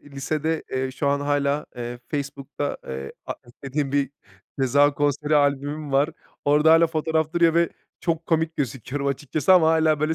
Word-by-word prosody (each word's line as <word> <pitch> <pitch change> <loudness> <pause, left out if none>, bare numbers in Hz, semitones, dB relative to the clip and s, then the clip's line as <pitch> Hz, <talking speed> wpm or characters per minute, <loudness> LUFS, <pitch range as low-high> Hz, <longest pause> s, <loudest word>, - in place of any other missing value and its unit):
Lisede, 155 +3 -2
eee, 130 0 -1
şu 140 +2 -1
an 140 0 +1
hâlâ, 145 0 0
eee, 120 0 -5
Facebook'ta, 140 0 -4
eee, 65 +1 -5
arşivlediğim 135 +3 -5
bir 140 -2 +1 0.5
Ceza 145 +2 +4
konseri 145 +1 +1
albümüm 145 +1 0
var. 140 +3 +3 0.3
Orada 150 +2 +5
hâlâ 165 +1 +6
fotoğraf 160 -1 -1
duruyor 170 -1 +3
ve 170 0 +3 0.3
çok 165 -1 -1
komik 160 -1 0
gözüküyorum 135 +1 -3
açıkçası 145 +6 +1
ama 170 -4 +6
hâlâ, 160 -2 +3
böyle, 155 +1 +1
145 Hz, 155 wpm, -24 LUFS, 140-160 Hz, 0.5 s, hâlâ